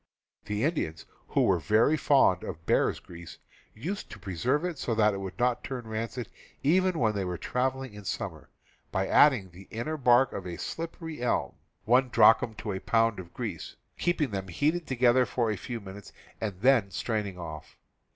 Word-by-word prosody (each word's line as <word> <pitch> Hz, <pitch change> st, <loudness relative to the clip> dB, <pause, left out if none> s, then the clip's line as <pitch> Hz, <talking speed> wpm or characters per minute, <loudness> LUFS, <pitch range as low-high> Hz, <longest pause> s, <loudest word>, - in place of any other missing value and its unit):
The 105 Hz, +2 st, -2 dB
Indians, 140 Hz, -, -1 dB, 0.2 s
who -, -, +2 dB
were -, -, +3 dB
very 110 Hz, +8 st, +3 dB
fond 135 Hz, -, +3 dB
of 80 Hz, -2 st, -7 dB
bear's -, -, +2 dB
grease, 85 Hz, -1 st, -11 dB, 0.4 s
used 185 Hz, -, -5 dB
to -, -, -9 dB
preserve 110 Hz, -, -1 dB
it 170 Hz, -6 st, -4 dB
so 115 Hz, -, -1 dB
that 105 Hz, -1 st, +4 dB
it 100 Hz, -, -4 dB
would 95 Hz, -2 st, -6 dB
not 120 Hz, 0 st, +1 dB
turn 125 Hz, -3 st, -5 dB
rancid 115 Hz, +2 st, -4 dB, 0.4 s
even 180 Hz, +4 st, +3 dB
when 110 Hz, -5 st, +2 dB
they 100 Hz, -2 st, -1 dB
were 90 Hz, -1 st, -3 dB
traveling 130 Hz, +1 st, -2 dB
in 105 Hz, 0 st, -10 dB
summer, -, -, -5 dB, 0.4 s
by 95 Hz, 0 st, 0 dB
adding 120 Hz, -11 st, +4 dB
the 95 Hz, +3 st, -14 dB
inner 135 Hz, +8 st, -3 dB
bark 125 Hz, -1 st, +4 dB
of 100 Hz, -, -4 dB
the 85 Hz, -1 st, -5 dB
slippery 165 Hz, -2 st, -6 dB
elm 125 Hz, -, 0 dB, 0.3 s
(1 125 Hz, +3 st, +4 dB
drachm 110 Hz, -1 st, +5 dB
to 105 Hz, 0 st, -5 dB
a 95 Hz, -, -3 dB
pound 115 Hz, 0 st, +2 dB
of 85 Hz, -2 st, -9 dB
grease), -, -, -6 dB, 0.2 s
keeping 170 Hz, -7 st, 0 dB
them 95 Hz, -1 st, -3 dB
heated 155 Hz, -, 0 dB
together 125 Hz, 0 st, +4 dB
for 115 Hz, -3 st, 0 dB
a -, -, -1 dB
few 120 Hz, +5 st, -6 dB
minutes, 100 Hz, -1 st, -10 dB, 0.3 s
and 100 Hz, -4 st, -4 dB
then 125 Hz, -5 st, +4 dB
straining 105 Hz, -2 st, -3 dB
off. 80 Hz, -4 st, -8 dB
115 Hz, 180 wpm, -28 LUFS, 95-130 Hz, 0.4 s, drachm